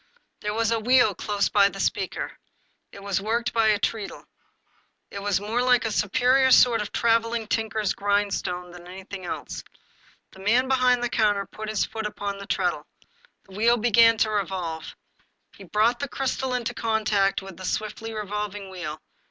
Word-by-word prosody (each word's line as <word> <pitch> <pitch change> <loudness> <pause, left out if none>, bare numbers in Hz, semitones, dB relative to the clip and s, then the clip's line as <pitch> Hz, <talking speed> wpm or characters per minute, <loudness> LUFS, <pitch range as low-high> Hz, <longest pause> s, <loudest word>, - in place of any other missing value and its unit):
There 210 0 -3
was 230 0 +1
a 230 - +1
wheel 245 -1 +4
close 200 +1 -1
by 200 -1 +4
the - - -10
speaker. - - -2 0.6
It 200 - -12
was 200 -1 -1
worked 235 +4 -1
by 225 -1 +3
a 210 -1 +4
treadle. 210 -1 -3 0.9
It 200 - -6
was 200 -1 +1
more 220 +4 -1
like 250 -2 +3
a 225 - -1
superior 250 +6 +3
sort 240 -3 +6
of 210 - -5
traveling 230 0 +1
tinker's 220 -2 -1
grindstone 200 -3 -1
than 175 0 -12
anything 190 +1 -9
else. - - -5 0.7
The 190 - -16
man 235 +7 +2
behind 250 -2 +3
the 245 - 0
counter 205 -4 +1
put 215 +2 -8
his 215 -2 0
foot 220 -1 -4
upon 200 -1 -5
the 200 - -9
treadle. 180 -8 -1 0.6
The 190 - -14
wheel 235 +3 +3
be 235 +1 0
gan 230 +1 +6
to 215 -1 +2
revolve. 185 -5 -3 0.6
He 195 - -12
brought 220 +6 +2
the 280 - -2
crystal 265 -1 -2
into 240 -1 -2
contact 215 -4 +1
with 195 -2 -10
the 185 - -9
swiftly 215 +3 -3
revolving 205 -2 -5
wheel. 170 -5 -6
210 Hz, 175 wpm, -25 LUFS, 200-230 Hz, 0.9 s, sort